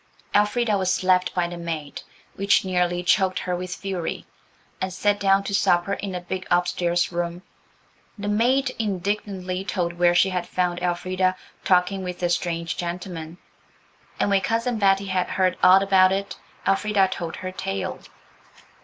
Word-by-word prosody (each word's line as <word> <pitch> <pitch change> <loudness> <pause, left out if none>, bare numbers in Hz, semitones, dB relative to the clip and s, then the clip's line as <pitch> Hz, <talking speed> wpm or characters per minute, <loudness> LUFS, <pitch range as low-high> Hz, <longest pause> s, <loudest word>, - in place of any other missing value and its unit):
Elfrida 210 0 +2
was 185 -1 +1
slapped 185 -1 +2
by 175 -1 +1
the 175 0 -7
maid, 160 -4 -5 0.3
which 200 0 +2
nearly 180 -1 0
choked 185 +1 +2
her 180 - -2
with 180 0 -5
fury, 190 -4 -4 0.6
and 190 - -1
set 205 +2 +1
down 195 0 +3
to 200 - -4
supper 180 -1 +2
in 200 -1 -4
the 180 - -3
big 185 +1 -5
upstairs 175 0 +1
room. 175 +1 -3 0.7
The 205 0 -5
maid 250 +6 +2
indignantly 195 -2 -2
told 175 -3 -2
where 175 0 +3
she 185 +2 +4
had 180 -1 -2
found 180 -1 -1
Elfrida 185 +1 0 0.3
"talking 185 +1 +2
with 180 -1 -6
a 175 - +2
strange 170 -1 -2
gentleman," 175 -2 -5 0.8
and 205 - +1
when 195 -1 +3
Cousin 230 +3 -1
Betty 195 -1 +3
had 185 -2 0
heard 185 -1 +1
all 185 +2 +7
about 190 -1 +5
it 195 +1 -2 0.3
Elfrida 195 0 +2
told 170 -3 -5
her 185 0 -6
tale. 95 - -4
185 Hz, 155 wpm, -24 LUFS, 175-195 Hz, 0.8 s, all